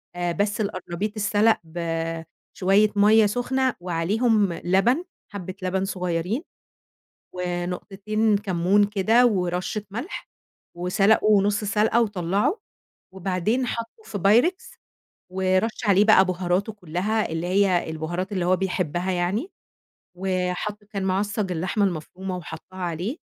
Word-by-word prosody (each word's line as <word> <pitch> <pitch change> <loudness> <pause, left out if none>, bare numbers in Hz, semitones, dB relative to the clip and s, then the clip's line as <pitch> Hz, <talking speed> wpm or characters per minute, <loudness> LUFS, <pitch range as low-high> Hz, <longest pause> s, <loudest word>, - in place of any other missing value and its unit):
آآ، 175 -1 -1
بس 205 +4 -1
القرنبيط 190 +1 -3
اتسلَق 215 +1 +2
بشوية 165 +4 -1
مَيّه 210 +2 +6
سُخنة 255 +4 0
وعليهم 195 +4 +1
لبن، 195 - +2 0.3
حَبّة 185 -2 -5
لبن 190 +1 -1
صغيّرين، 180 - -2 0.9
ونقطتين 195 +4 -1
كمّون 195 0 +2
كده 215 +4 +3
ورشّة 185 0 -1
ملح، 245 - -6 0.5
وسلَقه 200 +3 +3
نُص 205 +1 0
سلْقة 215 +3 +2
وطلّعه، 205 - 0 0.5
وبعدين 190 +7 0
حَطّه 230 - -5
في 205 - -5
Pyrex 240 - +2 0.6
ورَش 190 +4 0
عليه 200 +1 +5
بقى 195 -3 +6
بُهاراته 185 +3 -1
كلّها 200 +3 -2
اللي 165 +2 -2
هي 185 -3 +2
البُهارات 175 +5 -4
اللي 185 -3 -1
هو 185 +1 +4
بيحبّها 180 -1 -1
يعني، 185 - -1 0.6
و 185 -1 -1
حَط 210 +2 -5
كان 200 -2 -5
معصّج 200 +1 -1
اللحمة 185 +5 0
المفرومة 185 +2 -4
وحَطّها 175 +3 -10
عليه، 180 - -3
195 Hz, 115 wpm, -24 LUFS, 180-215 Hz, 0.9 s, مَيّه